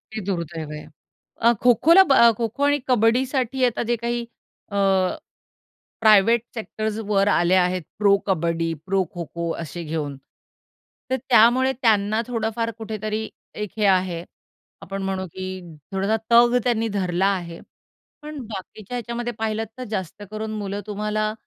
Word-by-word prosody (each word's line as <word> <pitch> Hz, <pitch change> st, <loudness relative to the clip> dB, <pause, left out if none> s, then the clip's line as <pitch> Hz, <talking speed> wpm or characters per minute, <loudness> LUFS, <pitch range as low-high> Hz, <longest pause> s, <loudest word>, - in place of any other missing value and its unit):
हे 220 Hz, -, -3 dB
दुर्दैव 170 Hz, -5 st, -4 dB
आहे. 150 Hz, 0 st, -7 dB, 0.6 s
अ, 235 Hz, +1 st, +5 dB
खो-खोला 255 Hz, -, +6 dB
ब -, -, +6 dB
अ, 235 Hz, -3 st, +7 dB
खो-खो 235 Hz, +4 st, -2 dB
आणि 290 Hz, 0 st, +3 dB
कबड्डीसाठी 255 Hz, +2 st, +2 dB
आता 245 Hz, -1 st, 0 dB
जे 240 Hz, -, +3 dB
काही 240 Hz, 0 st, -1 dB, 0.5 s
अ, -, -, -5 dB, 1.3 s
प्रायव्हेट 220 Hz, +1 st, +5 dB
सेक्टर्स 220 Hz, -1 st, -4 dB
वर 200 Hz, -1 st, +2 dB
आले 175 Hz, -2 st, +3 dB
आहेत, 180 Hz, 0 st, 0 dB, 0.2 s
प्रो-कबड्डी, 170 Hz, -5 st, +1 dB
प्रो-खो-खो 175 Hz, -3 st, -2 dB
असे 165 Hz, +2 st, -7 dB
घेऊन. 150 Hz, -3 st, -3 dB, 0.9 s
तर 260 Hz, -, +2 dB
त्यामुळे 255 Hz, +1 st, +4 dB
त्यांना 215 Hz, -1 st, +3 dB
थोडंफार 230 Hz, -1 st, -2 dB
कुठेतरी 215 Hz, 0 st, -4 dB, 0.3 s
एक 210 Hz, -, -4 dB
हे 210 Hz, -, +1 dB
आहे. 180 Hz, -2 st, -2 dB, 0.6 s
आपण 195 Hz, +1 st, -5 dB
म्हणू 190 Hz, -1 st, -2 dB
की 185 Hz, 0 st, -6 dB, 0.5 s
थोडासा 195 Hz, +3 st, +1 dB
तग 240 Hz, +1 st, +6 dB
त्यांनी 230 Hz, -2 st, +1 dB
धरला 180 Hz, 0 st, +1 dB
आहे. 170 Hz, -1 st, -9 dB, 0.6 s
पण 300 Hz, -1 st, -7 dB
बाकीच्या 215 Hz, +2 st, -7 dB
ह्याच्यामध्ये 240 Hz, 0 st, -4 dB
पाहिलत 220 Hz, 0 st, -1 dB
तर 255 Hz, -, -4 dB
जास्त 190 Hz, +1 st, -5 dB
करून 215 Hz, 0 st, -4 dB
मुलं 200 Hz, 0 st, -4 dB
तुम्हाला, 215 Hz, +1 st, -1 dB
215 Hz, 135 wpm, -23 LUFS, 190-235 Hz, 1.3 s, अ